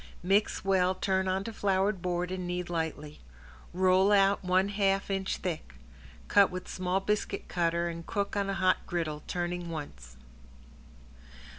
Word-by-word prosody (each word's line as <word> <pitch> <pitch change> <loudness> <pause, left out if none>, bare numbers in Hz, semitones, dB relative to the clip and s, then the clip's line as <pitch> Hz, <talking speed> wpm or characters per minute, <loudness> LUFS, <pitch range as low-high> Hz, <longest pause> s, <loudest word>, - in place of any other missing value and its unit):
Mix 195 +2 +1
well, 185 -1 +3
turn 190 0 0
onto 190 +4 -1
floured 195 -2 0
board 180 0 -1
and 185 -1 -4
knead 180 0 -2
slightly. 160 -3 -4 0.5
Roll 185 +2 +4
out 200 -1 +4
one 185 +2 +2
half 195 -1 +1
inch 195 -1 -1
thick. 160 - -5 0.5
Cut 200 -1 +5
with 185 0 -6
small 185 +1 -1
biscuit 210 +2 -2
cutter 170 0 0
and 170 0 -5
cook 200 +4 -2
on 200 -1 0
a 195 - -1
hot 185 0 +3
griddle, 160 -4 -2
turning 175 -1 -3
once. 70 - -8
185 Hz, 145 wpm, -30 LUFS, 175-195 Hz, 0.5 s, Cut